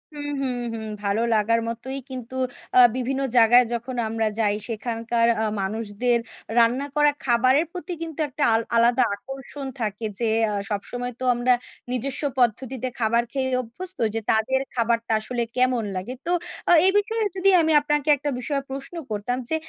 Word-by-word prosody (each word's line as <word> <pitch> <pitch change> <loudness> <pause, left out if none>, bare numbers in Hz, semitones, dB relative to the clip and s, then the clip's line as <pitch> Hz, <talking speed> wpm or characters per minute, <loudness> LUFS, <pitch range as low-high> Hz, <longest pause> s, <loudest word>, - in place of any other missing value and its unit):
হুম, 290 0 -5
হুম, 255 -2 -1 0.2
হুম 220 -1 -5 0.2
ভালো 200 +2 0
লাগার 230 +2 +2
মতোই 255 +4 -5
কিন্তু। 255 -1 -7 0.4
আ - - +9 0.2
বিভিন্ন 265 +2 -2 0.2
জায়গায় 240 +2 +7
যখন 240 +2 -4
আমরা 225 0 -1
যাই, 210 -2 +2
সেখানকার 230 +1 -1
আ - - +1 0.2
মানুষদের 220 +4 -1 0.4
রান্না 240 +4 +3
করা 295 0 +5
খাবারের 255 +5 +3
প্রতি 360 0 -6
কিন্তু 325 -2 -6
একটা 285 +2 -3
আল 225 - +3
আলাদা 235 +2 +4
আকর্ষণ 270 +5 -8 0.2
থাকে; 215 +1 -3
যে 230 -2 +1 0.2
আ - - -2 0.2
সবসময় 245 +4 -4
তো - - -5
আমরা 245 +1 +3 0.4
নিজস্ব 260 +3 -2 0.2
পদ্ধতিতে 255 +2 0
খাবার 235 +1 +2
খেয়েই 260 -2 -1
অভ্যস্ত 365 +11 -6 0.2
যে, 225 - +1
তাদের 225 +5 +1 0.2
খাবারটা 230 -1 0
আসলে 240 +2 -3
কেমন 250 -2 +2
লাগে? 185 +7 -4
তো 345 - -1 0.4
আ - - +6
এই 380 - +6
বিষয়ে 445 +2 +1
যদি 385 +1 +4
আমি 320 0 +2
আপনাকে 295 0 0
একটা 290 +2 -3
বিষয়ে 275 +2 -2
প্রশ্ন 275 +5 -7 0.2
করতাম 215 +4 -2
যে, 320 - +1
245 Hz, 165 wpm, -24 LUFS, 230-270 Hz, 0.4 s, আ